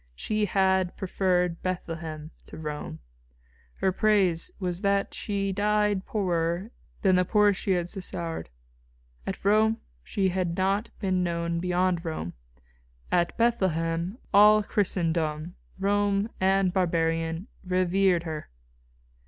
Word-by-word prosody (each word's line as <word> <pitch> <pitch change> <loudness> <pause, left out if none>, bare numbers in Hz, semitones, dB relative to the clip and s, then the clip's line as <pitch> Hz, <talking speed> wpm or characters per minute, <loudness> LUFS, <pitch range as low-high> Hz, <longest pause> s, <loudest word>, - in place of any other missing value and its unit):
She 215 - 0
had 190 -2 +1
preferred 180 -2 0
Bethlehem 165 -4 -4 0.2
to - - -10
Rome. 150 - -5 0.8
Her 190 - +1
praise 190 -4 +2
was 180 -1 -3
that 200 -1 +1
she 200 -2 -2
died 210 0 +1
poorer 175 0 -1 0.3
than 190 -2 +5
the 180 - +4
poorest 205 +1 +3
she 195 - +1
had 175 -1 0
succoured. 175 - -4 0.8
At - - -5
Rome 215 +2 +4 0.3
she 190 - 0
had 180 -2 -1
not 195 +4 +1
been 185 -2 0
known 170 -1 -1
beyond 180 0 +1
Rome. 155 - -4 0.8
At 175 -1 +1
Bethlehem 180 -5 0 0.2
all 210 +1 +7
Christendom, 165 -5 -1 0.2
Roman 200 +2 +1
and 190 -1 +2
barbarian, 165 -1 0 0.2
revered 185 -1 +2
her." 155 -2 -6
185 Hz, 115 wpm, -27 LUFS, 170-200 Hz, 0.8 s, all